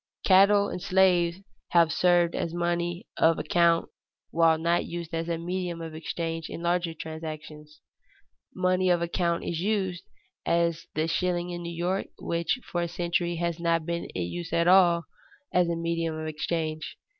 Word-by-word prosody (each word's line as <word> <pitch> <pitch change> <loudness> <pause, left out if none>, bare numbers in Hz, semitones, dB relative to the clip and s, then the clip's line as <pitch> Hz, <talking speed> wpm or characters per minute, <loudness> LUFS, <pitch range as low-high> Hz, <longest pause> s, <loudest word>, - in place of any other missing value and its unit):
Cattle 200 +1 +6
and 180 - -5
slaves 180 -1 +3 0.3
have 170 -2 +5
served 175 -1 +3
as 170 0 -3
money 175 +2 -1
of 165 0 +4
account 170 +1 +2 0.4
while 165 -1 +4
not 170 +2 +1
used 170 -1 -6
as 165 +1 -2
a 170 - 0
medium 175 0 -3
of 165 -1 -7
exchange 165 0 -4
in 170 - -7
larger 170 -1 0
transactions. 155 -1 -8 0.7
Money 185 0 +2
of 175 -1 +3
account 170 0 0
is 165 - -3
used, 190 -2 -1 0.4
as 170 -1 0
the 155 +1 +1
shilling 175 +1 -1
in 175 0 -5
New 170 0 -5
York, 180 +3 -1
which 170 +8 -1
for 175 - -3
a 170 - -1
century 175 0 -1
has 170 0 -2
not 165 -1 +1
been 170 0 -2
in 90 - -1
use 165 - -6
at 170 0 +2
all 175 -2 +5 0.5
as 180 -1 +3
a 170 - 0
medium 165 -1 -2
of 155 - -5
exchange. 155 0 -3
170 Hz, 165 wpm, -27 LUFS, 165-175 Hz, 0.7 s, Cattle